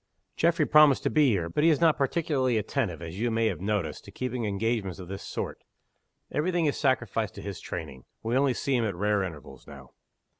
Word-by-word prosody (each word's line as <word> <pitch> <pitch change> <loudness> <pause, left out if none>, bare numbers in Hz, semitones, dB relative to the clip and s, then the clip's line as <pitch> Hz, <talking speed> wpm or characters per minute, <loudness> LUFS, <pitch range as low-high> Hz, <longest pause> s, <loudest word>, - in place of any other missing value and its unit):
"Geoffrey 165 -2 +2
promised 150 -3 +6
to - - 0
be 150 -3 +4
here. 90 -7 0
But 150 - -1
he 165 - +6
is 155 - +3
not 165 -2 +4
particularly 135 -4 0
attentive, 105 - -2
as 85 +3 -7
you 120 +2 +1
may 115 0 +1
have 110 - -1
noticed, 100 -4 -2
to - - -11
keeping 125 -2 -3
engagements 105 -2 -1
of 90 -2 -9
this 95 +1 -6
sort. - - -5 0.7
Every 160 +5 0
thing 175 -2 +1
is 145 - +1
sacrificed 120 -6 0
to - - -8
his 100 -2 -6
training. 75 -7 -7 0.2
We 115 +2 -1
only 135 -1 +3
see 140 - -1
him 120 -2 +2
at 100 -4 -2
rare 105 +2 +1
intervals 80 -7 -8
now." - - -12
115 Hz, 215 wpm, -27 LUFS, 95-140 Hz, 0.7 s, promised